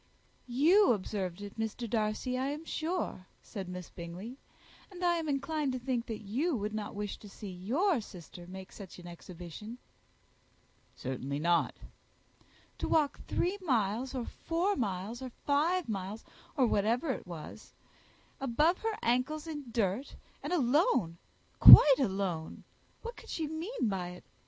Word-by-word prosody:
"You 315 +8 +5
observed 195 -2 -4
it, 205 +2 -9
Mr. 225 +2 -3
Darcy, 215 +3 -1
I 260 +1 0
am 295 +3 -4
sure," 320 - -3 0.2
said 195 -5 -7
Miss 180 -1 -7
Bingley; 185 +10 -8 0.5
"and 365 -2 -5
I 345 -1 +3
am 320 -2 -3
inclined 280 0 -1
to - - -1
think 245 -1 -2
that 220 -1 -5
you 270 - 0
would 210 -1 -3
not 215 -2 -4
wish 205 0 -4
to 210 - -13
see 200 0 -8
your 250 - +1
sister 175 -3 -11
make 190 +1 -9
such 195 -4 -10
an 175 - -12
exhibition." 175 +5 -9 1.2
"Certainly 130 +2 -4
not." 170 +3 +2 1.0
"To - - -1
walk 300 -3 +2
three 380 +4 0
miles, 245 - 0
or 245 -2 -2
four 355 +5 -1
miles, 210 0 -3
or 260 - -5 0.2
five 320 +4 +2
miles, 200 0 -4 0.3
or 265 - +5
whatever 230 +7 +1
it 235 - -5
is, 160 -3 -9 0.7
above 295 +7 +2
her 445 -1 -2
ancles 255 +6 +1
in 300 -3 -6
dirt, 225 +3 -1 0.3
and - - -5
alone, 250 - +2 0.4
quite 280 -2 +12
alone! 190 - -2 0.4
what 470 +1 -6
could - - -13
she 320 - -2
mean 320 - -2
by 190 -3 -2
it? 180 - -13
235 Hz, 150 wpm, -32 LUFS, 195-300 Hz, 1.2 s, quite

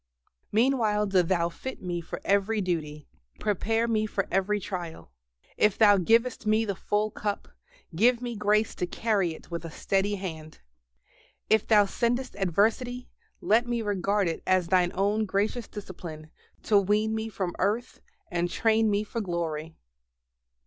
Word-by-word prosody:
Meanwhile 220 -3 +2
do 195 -2 +3
Thou 170 -1 +1
fit 260 +9 -7
me 175 -2 -3
for 165 - -7
every 200 +2 +2
duty, 155 -6 -3 0.3
prepare 225 +3 0
me 215 -2 +1
for 195 -2 -2
every 205 +2 +1
trial. 175 - -6 0.5
If 210 -2 +3
Thou 205 -2 +6
givest 225 +4 +2
me 215 +1 +3
the 200 - -1
"full 210 +3 -1
cup," 205 -1 -4 0.5
give 235 +6 +4
me 240 -1 -4
grace 210 +1 +1
to 180 - -3
carry 195 -5 0
it - - -16
with 170 -1 -4
a 165 - -6
steady 195 +5 0
hand. 160 -5 -7 0.9
If 220 -1 +3
Thou 210 -2 +6
sendest 240 +5 -1
adversity, 225 +7 0 0.3
let 230 +3 +3
me 240 -1 -1
regard 200 -1 0
it 165 - -3
as 185 -2 +2
Thine 180 -2 +3
own 205 +3 +1
gracious 205 +4 -1
discipline, 165 -6 -9 0.3
to 205 -2 +4
wean 210 +3 +1
me 220 0 -3
from 185 -5 -3
earth 230 +5 -1 0.3
and 175 0 0
train 220 +3 +2
me 205 0 +1
for 225 +2 -4
glory. 165 -4 -3
205 Hz, 155 wpm, -27 LUFS, 180-220 Hz, 0.9 s, Thou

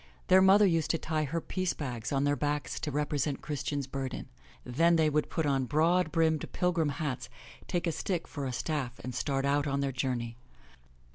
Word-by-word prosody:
Their 185 +1 +7
mother 195 +2 +7
used 165 -5 +2
to 165 - +2
tie 155 -1 -1
her 165 +4 -2
piece 185 +2 -2
bags 120 -6 -5
on 135 -1 +1
their 145 0 +2
backs 145 0 -2
to 155 - -3
represent 145 -1 -1
Christian's 140 -1 -2
burden. 135 -1 -5 0.3
Then 165 +8 +3
they 155 -2 +3
would 150 +1 +1
put 160 - -1
on 135 -2 +1
broad 160 +4 +2
brimmed, 160 -2 +1
pilgrim 170 -4 +1
hats, 145 -3 -3 0.4
take 175 0 -1
a 170 - +1
stick 175 +1 -2
for 140 -2 -4
a - - -2
staff 130 -1 -2
and 130 - -5
start 135 0 -1
out 145 +1 +2
on 140 0 0
their 140 -1 0
journey. 120 -3 -2
145 Hz, 195 wpm, -30 LUFS, 135-165 Hz, 0.4 s, Their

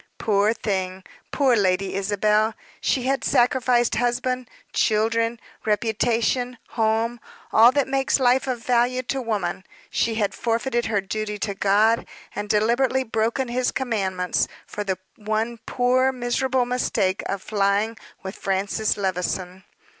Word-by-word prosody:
Poor 205 0 +2
thing 190 -4 -3 0.3
poor 270 -4 +3
Lady 190 -2 +1
Isabel! 210 +2 +1 0.2
She 255 - 0
had 265 -2 0
sacrificed 245 -1 +2
husband, 245 +1 -1 0.2
children, 230 +2 +1 0.2
reputation, 230 +3 0
home, 225 +1 0 0.3
all 230 +3 +8
that 285 -1 +1
makes 270 +1 +1
life 255 +1 +3
of 240 -3 -3
value 250 +1 +2
to 265 +2 -2
woman. 200 -6 -2 0.3
She 230 -1 0
had 210 -2 0
forfeited 235 +1 -1
her 205 -3 +1
duty 210 +2 -4
to 205 0 -2
God, 210 +4 +2 0.2
had 205 0 -5
deliberately 240 +5 +2
broken 230 +2 -1
his 250 +1 0
commandments, 190 -8 -1 0.2
for 210 - -5
the 190 -2 -2 0.2
one 220 +2 -2
poor 255 +1 +2
miserable 255 +1 0
mistake 220 -6 0
of 195 -1 -3
flying 205 +2 +1 0.3
with 190 +1 -6
Francis 195 +3 -1
Levison. 185 -1 -3
225 Hz, 130 wpm, -23 LUFS, 205-245 Hz, 0.3 s, all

